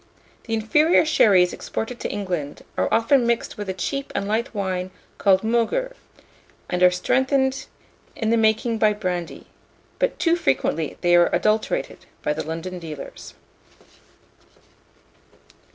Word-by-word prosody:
The 225 - -1
inferior 300 +11 +3
sherries 195 - +4
exported 235 +2 -5
to - - -3
England 175 -8 -4
are - - 0
often 235 +2 +3
mixed 235 -1 -1
with 205 -2 -6
a - - -1
cheap 275 +10 -3
and 200 - -1
light 220 +3 -1
wine 185 -3 -3 0.3
called 190 -1 +3
Moguer, 240 - 0 0.8
and 180 0 -1
are 180 - +8
strengthened 265 +8 0 0.5
in 225 -1 -1
the - - +4
making 225 +1 +1
by 215 -1 +4
brandy; 180 -5 -4 0.5
but - - 0
too 335 0 +2
frequently 160 - -1
they 175 -1 +4
are 175 0 +5
adulterated 215 - -1 0.2
by 150 - +1
the 155 - -4
London 165 +4 -5
dealers. 155 -4 -9
215 Hz, 135 wpm, -23 LUFS, 180-240 Hz, 0.8 s, are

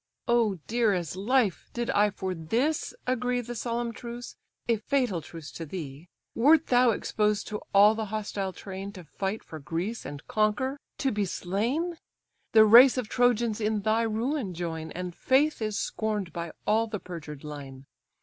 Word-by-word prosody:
"Oh, 235 -4 +3
dear 230 -2 +2
as 175 -3 -2
life! 215 +1 +1
did 240 0 -1
I 210 +1 +4
for 190 -1 -4
this 235 - -1
agree 250 0 0
The 240 0 -6
solemn 235 0 -2
truce, 240 +1 -8 0.3
a 230 -1 +3
fatal 235 -5 0
truce 155 0 -10
to 165 - -7
thee! 155 -1 -7 0.2
Wert 290 +6 +5
thou 245 0 +4
exposed 210 -1 0
to 210 -1 -4
all 205 +2 +7
the 220 0 -3
hostile 205 -2 -3
train, 195 +1 -7
To 180 - -10
fight 195 +7 -4
for 160 - -9
Greece, 175 +10 -3
and 140 +1 -8
conquer, 220 +6 0 0.2
to 270 - 0
be 210 -1 0
slain! 240 - -2 0.5
The 220 -1 +8
race 245 +5 +8
of 245 -4 -2
Trojans 240 -3 +2
in 210 0 0
thy 220 +2 +2
ruin 225 - -1
join, 160 -2 -4
And 180 0 -5
faith 275 - +2
is 215 -1 -1
scorn'd 210 -5 -2
by 170 -1 -4
all 220 +2 +2
the 215 -2 -4
perjured 155 -6 -8
line. 140 -3 -8
215 Hz, 170 wpm, -28 LUFS, 180-240 Hz, 0.5 s, The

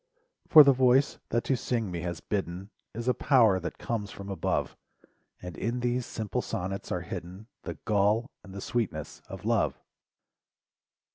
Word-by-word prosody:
For 155 -2 +10
the 140 -1 +6
voice 130 +2 +3
that 120 +1 +1
to 135 - +1
sing 115 -5 -2
me 85 - -3
has 85 -1 -4
bidden 95 0 -4 0.2
Is 115 +2 -5
a 125 - +4
power 115 -11 +4
that 90 - -6
comes 110 -4 -3
from 100 0 -9
above. 95 - -1 0.7
And 90 -2 -7
in 120 +7 -2
these 125 0 0
simple 110 -3 -3
sonnets 95 +2 -4
are 90 - -1
hidden 90 +4 -7 0.2
The - - -4
gall 105 +5 +2
and 100 - -12
the 100 +1 -7
sweetness 120 -2 -3
of - - -8
love. - - +1
105 Hz, 160 wpm, -28 LUFS, 95-120 Hz, 0.7 s, For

